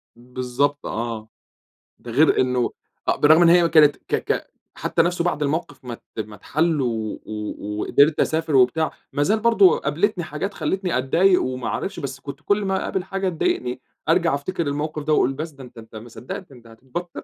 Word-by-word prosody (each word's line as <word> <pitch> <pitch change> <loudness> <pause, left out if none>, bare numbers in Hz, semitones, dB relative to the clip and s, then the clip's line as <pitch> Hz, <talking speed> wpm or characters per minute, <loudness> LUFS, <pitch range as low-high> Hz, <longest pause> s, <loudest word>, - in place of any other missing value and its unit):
بالضبط 125 +4 -2
آه، 115 -1 -4 0.7
ده 120 - -10
غير 150 +5 +4
إنّه 125 -1 +1 0.4
آآ، - - +3
بالرغم 155 +3 +6
إن 170 - +6
هي 170 0 +5
كانت 150 -3 +5
ك - - -6
ك - - -3 0.2
حتّى - - +1
نفسه 175 0 0
بعد 165 -4 -1
الموقف 145 -2 -2
ما 120 - -5
ت 115 - -10
ما 105 0 -7
اتحل 155 +7 0
و 115 -4 -2
و 105 -1 -5
وقدرت 145 +6 +3
أسافر 155 -3 +1
وبتاع، 155 +5 +3 0.2
ما 145 - 0
زال 215 +8 +2
برضه 220 -5 +5
قابلتني 175 +5 0
حاجات 175 +7 -4
خلتني 175 -1 -1
أتضايق 180 +8 +3
وما 130 -2 -3
اعرفش 195 -2 -3
بس 140 -2 -6
كنت 140 +1 -8
كل 205 +4 +1
ما 190 0 0
اقابل 185 -1 -2
حاجة 195 0 -2
تضايقني 125 -7 -1 0.3
أرجع 170 -2 +3
أفتكر 170 +4 -3
الموقف 150 +2 -3
ده، 155 +1 0
وأقول 135 -2 +3
بس 155 +4 -5
ده 140 -3 -12
أنت 125 - -14
أنت 110 0 -12
ما 115 +2 -9
صدقت، 125 +4 -8
أنت 120 -3 -16
هتتبطر. 135 +10 -7
145 Hz, 190 wpm, -22 LUFS, 125-170 Hz, 0.7 s, بالرغم